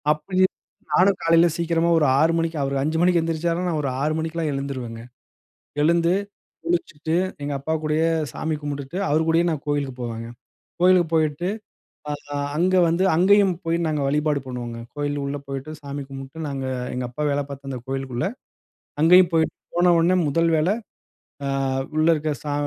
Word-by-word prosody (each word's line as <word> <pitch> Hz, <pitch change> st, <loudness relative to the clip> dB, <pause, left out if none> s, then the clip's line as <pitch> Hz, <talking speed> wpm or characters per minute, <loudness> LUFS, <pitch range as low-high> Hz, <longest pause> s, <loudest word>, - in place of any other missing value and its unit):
அப்பையே 185 Hz, +5 st, +1 dB, 0.5 s
நானும் 185 Hz, +6 st, +4 dB
காலையில 165 Hz, +1 st, +5 dB
சீக்கிரமா 170 Hz, 0 st, +1 dB
ஒரு 155 Hz, -, +3 dB
6 160 Hz, +2 st, +4 dB
மணிக்கு 165 Hz, -1 st, -1 dB
அவரு 140 Hz, 0 st, -1 dB
5 155 Hz, +3 st, 0 dB
மணிக்கு 175 Hz, -1 st, +4 dB
எந்திரிச்சார்னா, 165 Hz, +2 st, -1 dB
நான் 165 Hz, -3 st, 0 dB
ஒரு 140 Hz, -, -1 dB
6 150 Hz, +2 st, +1 dB
மணிக்கெல்லாம் 160 Hz, 0 st, -2 dB
எழுந்துருவங்க. 130 Hz, -5 st, -5 dB, 0.8 s
எழுந்து, 170 Hz, +2 st, +3 dB, 0.5 s
குளிச்சுட்டு 165 Hz, -2 st, -1 dB, 0.3 s
எங்க 145 Hz, 0 st, -2 dB
அப்பா 155 Hz, +4 st, -2 dB
கூடயே 155 Hz, +1 st, +1 dB, 0.2 s
சாமி 160 Hz, 0 st, -2 dB
கும்பிட்டுட்டு 145 Hz, +2 st, -5 dB
அவர் 155 Hz, +2 st, +2 dB
கூடயே 165 Hz, +1 st, +3 dB
நான் 155 Hz, -4 st, -3 dB
கோயிலுக்கு 145 Hz, -3 st, -1 dB
போவங்க. 115 Hz, -1 st, -5 dB, 0.5 s
கோயிலுக்கு 180 Hz, -2 st, +5 dB
போயிட்டு, 155 Hz, +2 st, +1 dB, 0.6 s
ஆ -, -, -1 dB, 0.4 s
அங்க 180 Hz, +3 st, +2 dB
வந்து 170 Hz, +3 st, +2 dB
அங்கேயும் 195 Hz, +1 st, +5 dB
போயி 165 Hz, +1 st, 0 dB
நாங்க 150 Hz, -2 st, -1 dB
வழிபாடு 150 Hz, 0 st, +1 dB
பண்ணுவோங்க. 120 Hz, -2 st, -5 dB, 0.2 s
கோயில் 145 Hz, 0 st, -2 dB
உள்ள 140 Hz, +1 st, -3 dB
போயிட்டு, 135 Hz, +2 st, -5 dB
சாமி 140 Hz, 0 st, -5 dB
கும்பிட்டு 135 Hz, +3 st, -8 dB
நாங்க, 135 Hz, -2 st, -4 dB, 0.3 s
எங்க 125 Hz, 0 st, -2 dB
அப்பா 150 Hz, +5 st, -3 dB
வேலை 145 Hz, 0 st, 0 dB
பார்த்த 140 Hz, 0 st, -7 dB
அந்த 130 Hz, -, -4 dB
கோயிலுக்குள்ள 135 Hz, 0 st, -2 dB, 0.7 s
அங்கேயும் 180 Hz, +2 st, +6 dB
போயிட்டு, 160 Hz, -1 st, +2 dB, 0.2 s
போன 175 Hz, 0 st, +5 dB
உடனே 175 Hz, +3 st, +3 dB
முதல் 165 Hz, +3 st, +2 dB
வேலை 170 Hz, +7 st, +2 dB, 0.7 s
ஆ, -, -, 0 dB, 0.5 s
உள்ள 155 Hz, 0 st, +3 dB
இருக்க 155 Hz, 0 st, -2 dB
சா 145 Hz, -, -3 dB
155 Hz, 160 wpm, -23 LUFS, 140-170 Hz, 0.8 s, அங்கேயும்